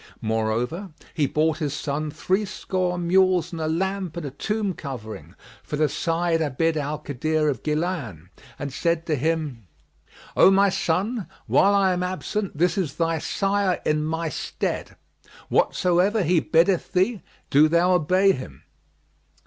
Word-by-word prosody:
More 110 0 0
over 155 - -3 0.2
he 145 -3 +1
bought 155 +3 +1
his 145 -3 -2
son 150 +1 -3
threescore 185 +1 -1
mules 180 -1 +2
and 165 -2 -5
a 155 - -1
lamp 185 +1 -2
and 170 - -4
a 140 - -5
tomb 210 +7 -2
covering 125 -9 -8 0.3
for - - -5
the 155 +1 +2
Sayyid 165 +2 0
Abd 160 +2 0
al 150 0 -2
Kadir 150 +2 -1
of 130 -6 -3
Gнlбn[FN#43] 150 - -3 0.3
and 145 -3 -5
said 170 +1 0
to 155 - 0
him, 145 - -2 0.7
"O - - +7
my 195 +1 +4
son, 195 +4 -1 0.2
while 200 +1 +4
I 195 -2 +3
am 180 - -2
absent, 185 0 -3
this 180 +5 +2
is 160 -8 -2
thy 165 -1 0
sire 195 +2 0
in 150 0 +1
my 160 +1 -2
stead: 150 - -4 0.5
whatsoever 185 +4 +2
he 175 +1 +3
biddeth 170 +3 +2
thee, 190 +3 +1 0.3
do 150 +3 +6
thou 170 +3 +3
obey 185 +3 +4
him." 75 - -7
165 Hz, 150 wpm, -24 LUFS, 150-185 Hz, 0.7 s, O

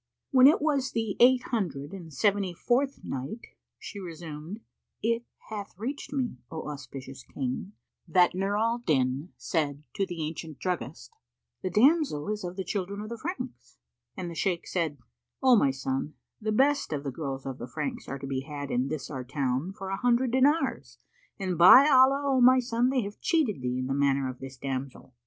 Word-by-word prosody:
When 260 -1 +8
it 295 0 +4
was 280 -4 +1
the 225 -3 -1
Eight 250 0 +6
Hundred 160 - -2
and 175 -5 -9
Seventy 195 +4 +1
fourth 265 +8 0
Night, 135 - -5 0.3
She 205 - -8
resumed, 165 +2 -7 0.4
It 230 +1 +1 0.3
hath 205 -4 -6
reached 260 +8 -5
me, 265 -4 -2
O 160 -1 -6
auspicious 135 -2 -9
King, 135 +9 -4 0.3
that 175 +1 +4
Nur 195 +2 0
al 230 +2 +1
Din 140 - 0
said 145 -3 -1
to 195 -2 -1
the 170 -3 -4
ancient 155 -1 -6
druggist, 165 - -4 0.5
"The 185 - -2
damsel 250 - +3
is 210 -1 -2
of 180 0 -5
the 190 - -3
children 200 +1 -3
of 215 - -7
the 235 - -5
Franks;" 355 +8 -6 0.4
and 185 -2 -4
the 170 - -6
Shaykh 175 +1 -1
said, 165 -5 -1 0.5
"O 260 -2 +7
my 170 -11 +4
son, 135 +2 -3 0.3
the 215 0 -1
best 280 +6 +2
of 145 -2 -2
the 140 - -3
girls 135 -1 -5
of 135 -1 -5
the 120 - -6
Franks 245 - -4
are 135 - -4
to 135 - -7
be 135 -1 -2
had 145 0 -6
in 125 +2 +1
this 145 -1 -4
our 130 -3 -4
town 130 +5 -1
for 195 0 -7
an 195 - -2
hundred 245 0 +2
dinars, 280 +6 +1 0.4
and 185 -4 -2
by 255 +11 +10
Allah, 270 0 +5
O 265 -2 +3
my 255 +1 +7
son, 240 0 +1
they 260 -1 +1
have 205 +1 -8
cheated 275 - +1
thee 125 0 -1
in 130 - -2
the 135 - -1
matter 140 -1 +2
of 130 0 -6
this 135 0 -9
damsel! 135 0 -5
185 Hz, 190 wpm, -28 LUFS, -, 0.5 s, by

